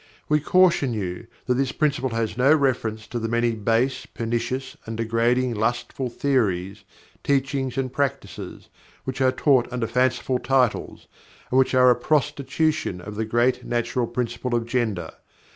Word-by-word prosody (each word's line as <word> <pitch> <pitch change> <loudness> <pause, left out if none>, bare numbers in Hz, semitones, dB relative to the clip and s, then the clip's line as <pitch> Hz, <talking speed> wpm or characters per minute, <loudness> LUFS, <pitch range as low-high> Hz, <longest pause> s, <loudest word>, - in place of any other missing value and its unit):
We 150 0 +3
caution 165 -6 +3
you 95 +1 -4 0.2
that 125 - +2
this 135 +1 0
Principle 140 -4 0
has 115 -1 -2
no 130 +4 +4
reference 115 -6 0
to 120 - -4
the 115 - -2
many 115 +1 +1
base, 115 +4 0
pernicious 120 +3 -3
and 115 0 -5
degrading 115 +2 +1
lustful 120 +3 -2
theories, 100 -8 -1 0.4
teachings 135 -2 0
and 130 -1 -2
practices, 130 -9 -4 0.3
which 130 0 -4
are 130 -1 +4
taught 130 -3 +2
under 125 -2 -1
fanciful 125 +1 +1
titles, 125 -2 0 0.5
and 130 - +4
which 130 0 +2
are 125 -1 +6
a - - +4
prostitution 150 - 0
of 105 +4 -8
the 110 +2 -2
great 120 +3 +1
natural 120 0 -1
principle 120 +1 -2
of 115 -1 0
Gender. 115 -6 -1
125 Hz, 150 wpm, -24 LUFS, 115-135 Hz, 0.5 s, are